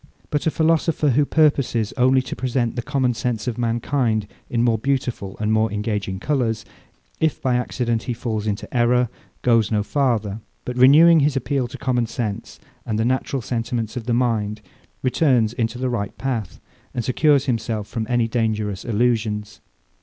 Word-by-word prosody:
But 145 +1 0
a - - +5
philosopher, 160 -1 +2
who 145 +4 +3
purposes 140 -8 +2
only 130 0 +3
to - - -5
represent 125 -2 -1
the 120 - -1
common 125 0 0
sense 115 -2 -2
of 120 -1 -2
mankind 115 -1 0 0.2
in 120 -1 +1
more 115 -2 +2
beautiful 125 -6 -2
and 105 0 +1
more 110 0 +2
engaging 105 -2 -2
colours, 115 -4 -1 0.5
if 160 -2 +1
by 130 -2 +1
accident 120 -2 -1
he - - +1
falls 110 -3 -3
into 100 -1 -2
error, 125 0 +3 0.3
goes 115 -4 +3
no 105 -2 +1
farther; 110 -5 0 0.3
but 125 - -4
renewing 155 +6 +7
his 145 -1 +2
appeal 135 0 -1
to - - -9
common 125 -4 0
sense, 110 -3 -4 0.2
and 110 - -2
the 110 - +1
natural 130 0 -1
sentiments 115 -1 -3
of 120 -2 -5
the 120 - +1
mind, 110 -4 0 0.4
returns 125 -4 +2
into 115 -1 -2
the 130 +1 -1
right 115 -5 -3
path, 115 -9 -3 0.4
and 120 -3 -2
secures 140 +2 +3
himself 110 -4 -2
from 110 -2 -4
any 120 -2 +2
dangerous 110 -4 -1
illusions. 110 -2 -1
120 Hz, 170 wpm, -22 LUFS, 110-130 Hz, 0.5 s, renewing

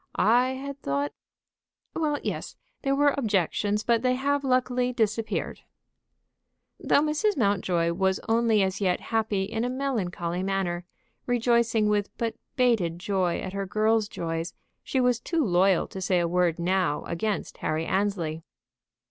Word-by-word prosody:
I 245 +4 +3
had 280 +1 -7
thought 140 +1 -1 0.4
" - - -57
"Well, 305 -2 0
yes; - - -4 0.3
there 275 0 +1
were 285 0 +4
objections, 210 - 0
but 235 -1 +2
they 255 0 +2
have 285 +2 0
luckily 255 -1 +1
disappeared." 225 -2 -1 1.2
Though - - +3
Mrs. 310 +6 +1
Mountjoy 185 -6 +1
was 190 +1 +1
only 225 -2 +3
as 190 +1 -2
yet 185 -2 +2
happy 220 -3 -1
in 220 +3 -3
a 245 - 0
melancholy 190 -10 -2
manner, 190 -2 -1 0.4
rejoicing 235 -2 +2
with 205 -1 +1
but 230 -1 -1 0.2
bated 225 -10 +2
joy 185 -1 0
at 185 - -5
her 195 -1 -3
girl's 215 +1 +2
joys, 165 0 -4 0.3
she 265 - -1
was 250 -2 +2
too 325 +2 0
loyal 185 -1 +3
to 190 - -7
say 185 -1 +2
a 170 - +1
word 175 -1 +1
now 180 -3 0
against 200 +5 -3
Harry 155 +1 -1
Annesley. 180 -5 -1
210 Hz, 150 wpm, -26 LUFS, 180-245 Hz, 1.2 s, were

